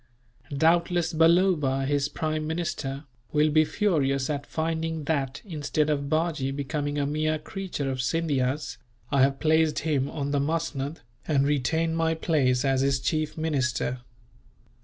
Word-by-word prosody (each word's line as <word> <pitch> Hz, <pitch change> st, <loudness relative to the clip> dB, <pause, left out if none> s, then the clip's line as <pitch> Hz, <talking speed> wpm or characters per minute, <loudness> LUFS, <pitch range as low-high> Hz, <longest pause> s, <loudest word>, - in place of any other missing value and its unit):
Doubtless 170 Hz, +2 st, +2 dB
Balloba, 160 Hz, -5 st, +3 dB
his 140 Hz, 0 st, 0 dB
prime 155 Hz, -1 st, -2 dB
minister, 155 Hz, -4 st, -3 dB, 0.3 s
will 150 Hz, 0 st, +3 dB
be 155 Hz, +1 st, +5 dB
furious 145 Hz, -7 st, 0 dB
at 145 Hz, -1 st, -4 dB
finding 160 Hz, 0 st, -2 dB
that, 140 Hz, -3 st, -2 dB
instead 155 Hz, -3 st, -1 dB
of 140 Hz, -1 st, -1 dB
Bajee 155 Hz, -4 st, 0 dB
becoming 145 Hz, +1 st, -2 dB
a 145 Hz, -, +1 dB
mere 155 Hz, +2 st, 0 dB
creature 175 Hz, -2 st, -5 dB
of 130 Hz, -1 st, -1 dB
Scindia's, 140 Hz, -1 st, -1 dB, 0.3 s
I 140 Hz, -2 st, +3 dB
have 135 Hz, 0 st, +3 dB
placed 160 Hz, 0 st, +3 dB
him 140 Hz, -3 st, 0 dB
on 140 Hz, -2 st, -3 dB
the 145 Hz, -, +1 dB
musnud, 155 Hz, -1 st, -2 dB, 0.3 s
and 140 Hz, -3 st, +2 dB
retain 160 Hz, +4 st, +1 dB
my 165 Hz, 0 st, +1 dB
place 140 Hz, -6 st, +1 dB
as 135 Hz, -1 st, +2 dB
his 135 Hz, -1 st, +2 dB
chief 155 Hz, +3 st, -1 dB
minister. 130 Hz, -5 st, -1 dB
150 Hz, 140 wpm, -26 LUFS, 140-160 Hz, 0.3 s, be